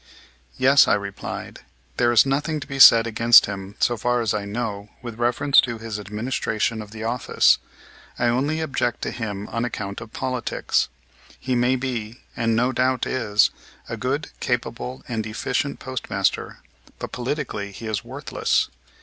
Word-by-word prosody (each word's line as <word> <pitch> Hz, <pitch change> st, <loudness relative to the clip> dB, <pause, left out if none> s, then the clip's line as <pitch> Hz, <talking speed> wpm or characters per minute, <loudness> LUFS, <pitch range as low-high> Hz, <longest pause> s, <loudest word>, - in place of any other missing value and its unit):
"Yes," 135 Hz, +2 st, +6 dB
I -, -, +4 dB
replied, 100 Hz, -1 st, -6 dB, 0.4 s
"there 120 Hz, -1 st, +3 dB
is 120 Hz, -, +6 dB
nothing 145 Hz, +3 st, -1 dB
to 140 Hz, -, -7 dB
be 135 Hz, -1 st, -6 dB
said 115 Hz, -3 st, +9 dB
against 115 Hz, +1 st, +6 dB
him, 100 Hz, 0 st, -7 dB
so 120 Hz, -, +2 dB
far 120 Hz, +3 st, +1 dB
as 115 Hz, -3 st, 0 dB
I 105 Hz, -1 st, -2 dB
know, 105 Hz, -1 st, -4 dB
with 115 Hz, -2 st, -7 dB
reference 135 Hz, +4 st, +4 dB
to 120 Hz, -2 st, -4 dB
his 110 Hz, -1 st, -5 dB
administration 110 Hz, +1 st, -2 dB
of 105 Hz, -, -10 dB
the 110 Hz, +1 st, -8 dB
office. 115 Hz, +2 st, +3 dB, 0.6 s
I 120 Hz, -, 0 dB
only 140 Hz, +7 st, +1 dB
object 125 Hz, -6 st, -1 dB
to -, -, -2 dB
him 105 Hz, -3 st, -5 dB
on 115 Hz, +1 st, -2 dB
account 100 Hz, -4 st, -4 dB
of 110 Hz, -1 st, -10 dB
politics. 130 Hz, -1 st, -1 dB, 0.5 s
He 130 Hz, -, -2 dB
may 125 Hz, +1 st, +2 dB
be, 120 Hz, -3 st, -4 dB, 0.2 s
and 115 Hz, -1 st, +1 dB
no 125 Hz, +3 st, +2 dB
doubt 130 Hz, 0 st, +1 dB
is, 105 Hz, -5 st, +2 dB, 0.4 s
a -, -, -4 dB
good, 140 Hz, +4 st, -2 dB
capable, 125 Hz, +1 st, -3 dB
and 115 Hz, -3 st, -2 dB
efficient 125 Hz, +6 st, -2 dB
postmaster; 130 Hz, -1 st, -2 dB, 0.4 s
but -, -, -6 dB
politically 125 Hz, -6 st, -3 dB
he 115 Hz, -, -9 dB
is 110 Hz, -4 st, -2 dB
worthless. -, -, -1 dB
120 Hz, 160 wpm, -23 LUFS, 110-130 Hz, 0.6 s, said